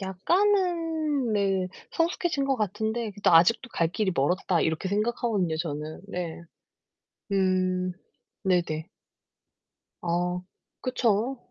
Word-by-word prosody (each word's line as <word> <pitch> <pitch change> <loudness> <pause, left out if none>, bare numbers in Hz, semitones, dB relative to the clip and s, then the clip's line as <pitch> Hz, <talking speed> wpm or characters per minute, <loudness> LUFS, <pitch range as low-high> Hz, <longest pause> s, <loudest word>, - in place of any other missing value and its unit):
약간은 325 - +1
네 195 -2 +1 0.2
성숙해진 330 -3 0
것 270 -1 +1
같은데 220 +2 -1
그래도 205 -2 +1
'아직도 200 +9 +5
갈 165 -5 +1
길이 190 +2 0
멀었다.' 170 +4 +1
이렇게 160 +4 0
생각하거든요 210 -4 0
저는 155 -1 -4
네. 175 -3 -4 0.9
음 185 -1 +1 0.5
네네. 170 -3 0 1.1
아 175 +1 0 0.4
그쵸. 250 0 +1
195 Hz, 220 characters per minute, -27 LUFS, 180-240 Hz, 1.1 s, 아직도